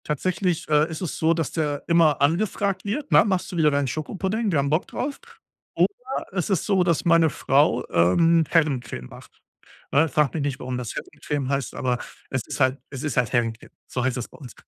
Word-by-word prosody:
Tatsächlich, 175 +3 -1
äh, 150 +1 +3
ist 160 -1 -6
es 175 -8 -4
so, 160 +1 +3
dass 165 -3 -2
der 150 -3 -2
immer 165 -4 +4
angefragt 190 +5 0
wird, 265 +8 -3
ne: - - +7
„Machst 190 -4 -1
du 175 - -5
wieder 155 -2 +4
deinen 140 -1 +1
Schokopudding? 190 - -2
Wir 160 - +1
haben 140 0 0
Bock 155 +4 0
drauf.“ 280 +2 -4 0.6
Oder 265 -9 -1
es 180 -1 -1
ist 190 -5 0
so, 195 -3 +3
dass 170 -3 0
meine 170 -2 +5
Frau, 140 +1 +2
ähm, 160 - +4
Herrencreme 140 - 0
macht, - - -15 0.5
ne? 160 +3 +3
Frag 145 0 +1
mich 160 - -2
nicht, 140 -3 -2
warum 125 0 -4
das 120 -4 -5
Herrencreme 145 -3 -4
heißt, 140 -1 -2
aber 125 -1 -1 0.3
es 130 - -1
ist - - -5
halt 130 +1 +2
es 135 0 -7
ist 150 -5 -3
halt 125 -2 +2
Herrencreme, 115 -3 -1 0.2
so 125 - -3
heißt 130 -1 0
es 120 - -4
bei - - -17
uns. 125 -6 -10
155 Hz, 210 wpm, -24 LUFS, 135-175 Hz, 0.6 s, ne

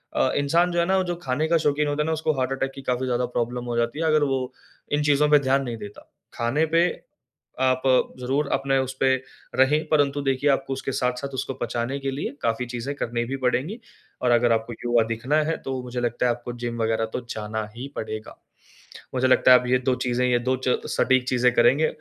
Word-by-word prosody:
अ, - - +3
इंसान 165 +5 +2
जो 175 - 0
है 170 - +3
ना, 190 +1 +2
वो 190 - +2
जो 175 -1 -3
खाने 135 +4 0
का 165 +1 +3
शौकीन 150 -1 +1
होता 145 +1 0
है - - -4
ना, 160 - -1
उसको 155 0 0
हार्ट 130 0 0
अटैक 135 0 -2
की 135 - -8
काफ़ी 125 0 -1
ज़्यादा 125 0 0
प्रॉब्लम 120 0 -3
हो 120 -1 -3
जाती 120 +6 -1
है, 165 - 0
अगर 155 -1 +3
वो 130 -2 -1 0.4
इन 145 0 +1
चीज़ों 150 0 +3
पे 150 0 +6
ध्यान 135 0 +1
नहीं 120 -3 -4
देता। 105 -1 -10 0.3
खाने 125 +7 +1
पे, 165 +2 +3 0.8
आप 130 0 +2 0.4
ज़रूर 135 +4 0
अपने 135 0 +1
उसपे 130 0 +1 0.4
रहें 145 +4 +3
परंतु 145 -2 +2
देखिए 135 +1 +1
आपको 135 0 +1
उसके 135 0 -4
साथ-साथ 125 +2 -1
उसको 130 +1 -3
पचाने 120 +3 -2
के 135 0 -3
लिए 135 - -3
काफ़ी 115 +2 0
चीज़ें 120 +3 -4
करनी 120 -3 -2
भी 135 +3 -4
पड़ेंगी 145 - 0 0.4
और 125 - +2
अगर 120 0 +4
आपको 115 +1 -2
युवा 120 -1 +3
दिखना 115 +6 -1
है 165 - 0
तो 130 -1 -3
मुझे 125 0 -5
लगता 120 0 -1
है 120 - +3
आपको 120 0 -5
जिम 120 -1 -3
वग़ैरह 115 0 +1
तो - - -1
जाना 110 0 -4
ही 130 +4 -6
पड़ेगा। 110 0 -6 0.8
मुझे 130 0 +2
लगता 130 0 +6
है 125 - +8
आप 125 - -6
ये 130 +1 +3
2 130 0 +1
चीज़े, 125 0 0
ये 120 - +3
2 130 +2 0
च 125 - +3
सटीक 130 -1 +2
चीज़े 125 0 +3
करेंगे, 125 +6 +4
130 Hz, 225 wpm, -24 LUFS, 120-145 Hz, 0.8 s, है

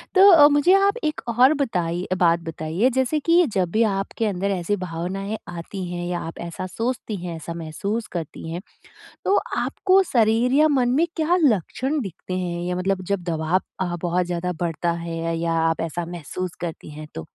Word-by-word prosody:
तो 390 +2 +9
अ, 295 -4 +9
मुझे 290 +5 +4
आप 395 +3 +4
एक 305 0 -1 0.2
और 260 +4 +7
बताई 180 - -1
अ, 185 - +2
बात 170 -2 +3
बताइए, 160 +9 0
जैसे 260 +4 +1
कि 340 +4 +4
जब 185 -3 +1
भी 225 - +3
आपके 205 +2 -1
अंदर 200 -1 -1
ऐसी 190 +1 0
भावनाएँ 190 +5 -4
आती 175 +2 -6
हैं 175 0 -4
या 175 0 -2
आप 165 - -7
ऐसा 170 +2 -5
सोचती 225 +2 -3
हैं, 170 -2 -4
ऐसा 165 +1 -6
महसूस 185 +7 -4
करती 160 -1 -6
हैं, 170 +2 -4 0.6
तो 400 - +3 0.2
आपको 385 0 +3
शरीर 230 +1 +3
या 310 +1 +6
मन 260 -4 +2
में 335 - +4
क्या 325 +2 +2
लक्षण 265 - +1
दिखते 185 - -6
हैं 175 -1 -3
या 180 - -1
मतलब 185 +1 -1
जब 195 - -1
दबाव 160 +3 +1 0.2
अ, 175 -2 -1
बहुत 175 +1 +1
ज़्यादा 180 +1 -2
बढ़ता 170 0 0
है 165 0 -2
या 165 0 -1 0.2
आप 165 - -1
ऐसा 165 +1 -3
महसूस 175 +1 -5
करती 165 -3 -6
हैं, 155 +1 -8
तो? 80 -1 -6
185 Hz, 190 wpm, -23 LUFS, 170-250 Hz, 0.6 s, तो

